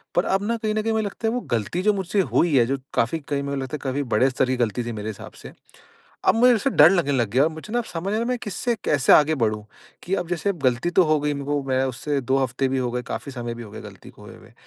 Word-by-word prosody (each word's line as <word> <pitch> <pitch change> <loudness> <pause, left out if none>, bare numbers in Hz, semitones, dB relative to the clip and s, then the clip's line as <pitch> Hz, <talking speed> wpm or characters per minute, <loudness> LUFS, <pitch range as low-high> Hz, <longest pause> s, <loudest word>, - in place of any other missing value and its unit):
पर 175 - +2
अब 195 +1 0
ना 235 0 0
कहीं 215 -1 -2
न 215 - +1
कहीं 225 +1 -1
मुझे 220 -1 0
लगता 225 +3 -4
है 225 - 0
वो 250 - -1
गलती 115 - -2
जो 210 +1 +3
मुझसे 195 +1 0
हुई 160 -6 +3
है 120 - +5
जो 135 +2 -1 0.2
काफ़ी 160 +8 0
कहीं 140 -1 -3
मुझे 140 0 -3
लगता 135 +3 -4
है - - -6
काफ़ी 140 +2 -1
बड़े 130 +5 +4
स्तर 130 0 +1
की 130 -1 0
गलती 120 0 -1
थी 120 - -3
मेरे 110 0 -5
हिसाब 105 - -9
से। - - -10 0.7
अब - - +5
मुझे 245 +2 +6
उससे 230 +5 +1
डर 155 - +7
लगने 175 -7 +1
लग 120 -6 +1
गया 130 +5 +2
है - - +4
और 160 - -6
मुझे 160 +7 -10
ना 240 - +2
अब 230 - -4
समझ 165 0 -6
में 195 - -2
नी 215 - 0
आ 230 - 0
रहा 250 - 0
किससे 235 +3 -2
कैसे 140 -2 +4
आगे 155 +1 +5
बढ़ूँ 110 -4 -1 0.4
कि 185 - -4
अब 170 - -8
जैसे 180 +3 -1
गलती 125 +7 +1
तो - - +7
हो 155 -1 +2
गई 150 +1 -1
है - - 0
मेरे 140 -1 -6
को 145 0 0
मैं 130 0 +2
उससे 135 +3 -2
2 130 +2 +1
हफ़्ते 130 +2 -1
भी 135 0 -1
हो 125 -2 -1
गए, 125 0 -2
काफ़ी 140 +3 -6
समय 120 -2 -5
भी 120 - -8
हो 105 - -12
गया - - -8
गलती - - -12
को - - -17
होए - - -12
हुए। - - -18
145 Hz, 315 wpm, -23 LUFS, 130-195 Hz, 0.7 s, डर